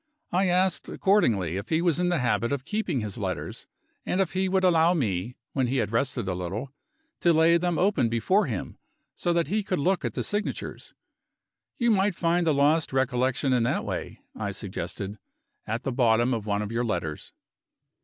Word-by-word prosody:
I 185 +2 +2
asked 180 0 +1
accordingly 110 - +2
if 100 - -6
he 160 - +2
was 170 -1 +2
in 180 0 +2
the 175 - +2
habit 120 -2 0
of 140 -2 -2
keeping 190 - -1
his 105 +2 -5
letters, 95 -4 -4 0.4
and 185 - -1
if 190 -3 +1
he 190 0 0
would 190 0 +1
allow 170 -1 +4
me 110 - -2 0.2
(when 130 -3 +1
he 130 +3 0
had 110 -4 0
rested 115 -3 -1
a 95 - 0
little) 100 +10 -5 0.5
to 175 - +4
lay 165 +1 +5
them 175 -1 0
open 175 - +2
before 175 - +2
him, 110 -7 -5 0.3
so 175 - -1
that 170 -1 +2
he 215 +3 0
could 190 -2 -2
look 180 +6 +1
at - - -3
the - - -1
signatures. 205 0 -4 0.8
"You 235 -1 +2
might 200 -2 +2
find 170 +1 +1
the - - +5
lost 150 +3 +3
recollection 130 0 +1
in 125 - +3
that 115 - 0
way," - - -5 0.2
I - - -3
suggested, 100 +1 -5 0.5
"at 115 +4 -2
the 135 - -1
bottom 120 0 +3
of 110 -2 -3
one 100 0 0
of 105 - -5
your 115 +1 0
letters." 85 -9 -3
140 Hz, 195 wpm, -26 LUFS, 115-180 Hz, 0.8 s, lay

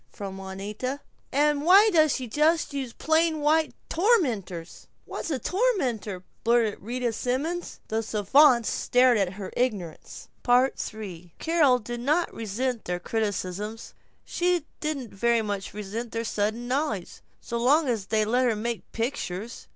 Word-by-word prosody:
from 195 -1 -7
Juanita. 205 +8 -5 0.3
"And 295 +1 +2
why 390 +7 +7
does 310 -4 +4
she 260 - -3
just 300 +6 +1
use 270 -4 -3
plain 320 +3 +1
white 310 +1 +2
tormenters?" 245 - 0 0.2
"What's - - -5
a 290 - 0
tormenter?" 250 - -1 0.2
blurted 230 -2 +2
Rita 240 +2 -2
Simons. 290 +10 -2
The 220 +1 -1
savants 235 +4 +4
stared 250 -2 +3
at 190 -2 0
her 195 -1 -7
ignorance. 205 -10 -3 0.2
III 215 -8 0
Carol 315 -6 +3
did 240 +1 -6
not 305 +8 +1
resent 230 +3 -3
their 180 0 -2
criticisms, 210 +1 -3 0.3
she 350 -3 0
didn't 285 -7 -4
very 235 +3 +2
much 205 -2 -4
resent 210 +3 -5
their 230 0 -1
sudden 220 +2 -2
knowledge, 250 - -2 0.2
so 235 - -4
long 285 +6 +4
as 220 -6 -1
they 215 -1 +2
let 250 +4 +2
her 235 -3 +2
make 230 +2 -4
pictures. 230 -3 -4
240 Hz, 140 wpm, -26 LUFS, 210-290 Hz, 0.3 s, why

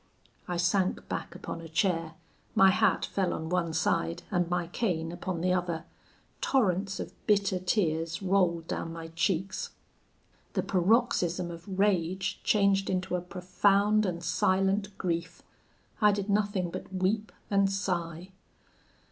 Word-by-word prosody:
I 175 - -2
sank 185 +2 +1
back - - -4
upon 165 - -6
a 165 - -9
chair; 165 -1 0 0.4
my 195 0 +7
hat 215 0 +2
fell 190 -2 -1
on 160 0 -4
one 175 -2 0
side, 80 - 0
and 175 -2 +1
my 175 -1 0
cane 170 -3 -2
upon 175 -1 -4
the 180 +1 +2
other: 175 -3 -1 0.6
torrents 195 -6 +1
of - - -5
bitter 200 -3 +3
tears 165 -3 0
rolled 180 -4 +1
down 165 - -3
my 165 -1 -7
cheeks. 175 +3 -1 0.8
The - - 0
paroxysm 185 -3 +2
of 175 +3 -8
rage 190 -1 +1
changed 200 -2 +3
into 185 -1 -1
a 180 - -1
profound 200 +3 +2
and 170 -1 -3
silent 195 +3 +1
grief: 170 -2 -3 0.6
I 210 -1 +6
did 200 0 -2
nothing 200 -4 +1
but - - -7
weep 195 +3 0 0.2
and 195 -1 +3
sigh. 180 -2 -3
185 Hz, 140 wpm, -29 LUFS, 170-195 Hz, 0.8 s, my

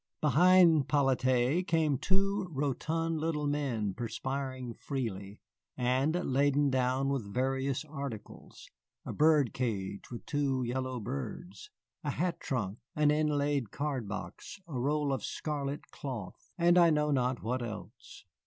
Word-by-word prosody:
Behind 165 -1 +5
'Polyte 130 +3 +2
came 155 -5 +2
two 195 +1 +1
rotund 160 +3 -1
little 155 -2 -1
men 130 -9 -1
perspiring 130 +2 -4
freely, 105 -7 -4 0.4
and 130 +5 +1
laden 140 +1 +2
down 130 +1 +1
with 125 -8 -2
various 135 +3 0
articles, 140 -7 -8 0.4
a - - -4
bird 150 -5 +4
cage 100 -6 -3
with 120 - -8
two 140 -3 0
yellow 130 +1 -2
birds, 140 - -6 0.3
a - - -1
hat 180 -1 -1
trunk, 110 -5 -3 0.2
an 150 -1 +4
inlaid 145 -5 +1
card 140 -4 -3
box, 100 - -7
a 160 - -9
roll 140 +3 0
of 135 - -3
scarlet 145 -2 -4
cloth, 115 -10 -7
and 175 0 +5
I 170 -1 +7
know 150 -1 +2
not 125 -2 0
what 125 +3 -1
else. 110 -4 -8
135 Hz, 130 wpm, -31 LUFS, 125-150 Hz, 0.4 s, I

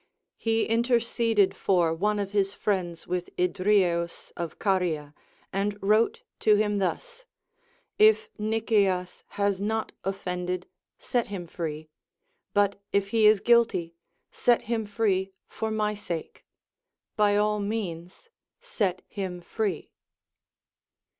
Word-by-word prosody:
He 225 0 +1
interceded 230 -3 +2
for 175 -4 +2
one 210 +5 0
of 200 -1 -3
his 200 -1 +1
friends 180 -5 -2
Avith 180 0 -3
Idrieus 180 -2 +1
of 170 -2 -5
Caria, 170 -7 0 0.4
and 200 +1 -1
wrote 215 +3 +2 0.2
to 215 - +5
him 210 -1 +1
thus: - - -3 0.7
If 435 +1 +5
Nicias 210 -4 0
has 200 -1 +1
not 220 +2 -1
offended, 180 -2 -3 0.3
set 245 -2 -1
him 195 -4 -5
free; 155 -2 -5 0.6
but 200 -1 +1
if 200 0 +1
he 220 0 +4
is 215 -2 +5
guilty, 230 -8 +3 0.4
set 240 -1 +2
him 225 -2 -2
free 195 -3 0
for 220 - -4
my 215 -1 0
sake; 175 -6 -6 0.7
by 205 -1 +3
all 210 0 +2
means 200 - -4 0.3
set 205 - -2
him 185 -3 -5
free. 190 -1 -3
200 Hz, 115 wpm, -27 LUFS, 180-220 Hz, 0.7 s, to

